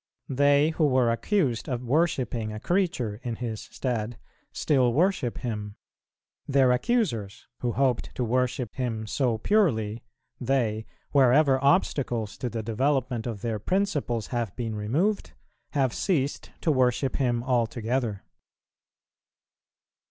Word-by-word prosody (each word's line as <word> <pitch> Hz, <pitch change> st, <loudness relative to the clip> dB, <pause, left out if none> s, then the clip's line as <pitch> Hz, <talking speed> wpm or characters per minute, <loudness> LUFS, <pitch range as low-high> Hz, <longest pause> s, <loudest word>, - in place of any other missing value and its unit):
They 145 Hz, +3 st, +4 dB
who 155 Hz, -1 st, +2 dB
were 130 Hz, -3 st, +3 dB
accused 130 Hz, -, 0 dB
of 125 Hz, -1 st, -2 dB
worshipping 125 Hz, -6 st, 0 dB
a 110 Hz, -, -6 dB
creature 130 Hz, -, 0 dB
in 120 Hz, -2 st, -3 dB
His 115 Hz, -2 st, -4 dB
stead, 120 Hz, -3 st, -3 dB, 0.3 s
still 130 Hz, -5 st, +2 dB
worship 165 Hz, -5 st, +1 dB
Him; 105 Hz, -4 st, -4 dB, 0.7 s
their 135 Hz, -2 st, +4 dB
accusers, 125 Hz, -, 0 dB
who 120 Hz, -2 st, -1 dB
hoped 130 Hz, -2 st, +1 dB
to 125 Hz, -, -1 dB
worship 125 Hz, 0 st, 0 dB
Him 115 Hz, -4 st, -2 dB
so 120 Hz, +1 st, 0 dB
purely, 115 Hz, -, +1 dB, 0.4 s
they, 115 Hz, -4 st, 0 dB, 0.2 s
wherever 135 Hz, 0 st, +4 dB
obstacles 130 Hz, -, +1 dB
to 125 Hz, -, -2 dB
the 115 Hz, -1 st, -4 dB
development 125 Hz, +1 st, 0 dB
of 110 Hz, -4 st, -5 dB
their 115 Hz, -2 st, -1 dB
principles 145 Hz, -, -1 dB
have 115 Hz, -5 st, -2 dB
been 115 Hz, -3 st, -3 dB
removed, 130 Hz, -, 0 dB, 0.4 s
have 135 Hz, -4 st, +1 dB
ceased 145 Hz, -8 st, -1 dB
to 160 Hz, -, +2 dB
worship 130 Hz, 0 st, +1 dB
Him 120 Hz, -3 st, 0 dB
altogether. 120 Hz, -3 st, -1 dB
125 Hz, 120 wpm, -27 LUFS, 115-140 Hz, 0.7 s, They